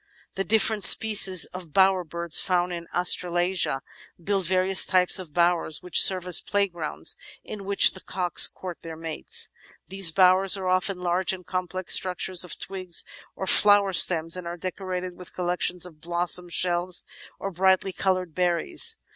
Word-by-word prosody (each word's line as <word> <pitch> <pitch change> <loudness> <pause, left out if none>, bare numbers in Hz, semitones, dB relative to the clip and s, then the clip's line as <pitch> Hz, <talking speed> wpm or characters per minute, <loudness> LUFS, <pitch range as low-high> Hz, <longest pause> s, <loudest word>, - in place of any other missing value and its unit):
The 195 - -4
diflFerent 215 +2 0
species 195 -2 +5
of 180 -4 -11
Bower 190 -1 +2
birds 170 0 +1
found 180 -1 -1
in 170 -1 -8
Australasia 175 -4 0 0.4
build 195 +2 -3
various 185 +1 +3
types 185 0 +1
of 180 -5 -11
"bowers" 170 -1 -1
which 180 - +5
serve 185 -2 +4
as 180 -2 +3
playgrounds 175 - -2 0.3
in 205 -2 -10
which 200 0 +4
the 190 - -11
cocks 180 -2 +2
court 180 -3 -10
their 165 -1 -9
mates. 160 -1 0 0.4
These 195 -2 +4
"bowers" 185 +3 +3
are 190 -1 -6
often 185 +1 -1
large 180 +2 -1
and 180 -1 -10
complex 185 0 -3
structures 185 0 0
of 180 - -6
twigs 185 -3 -4 0.3
or 190 - -6
flower 205 0 +3
stems 165 -1 +3
and 180 -2 -8
are 170 +1 -7
decorated 185 0 -7
with 180 0 -13
collections 180 0 -2
of 160 -4 -16
blossoms, 175 +1 0
shells, 175 0 0 0.3
or 195 - -6
brightly 190 +1 0
coloured 185 -3 -3
berries. 185 - 0
180 Hz, 155 wpm, -23 LUFS, 175-190 Hz, 0.4 s, species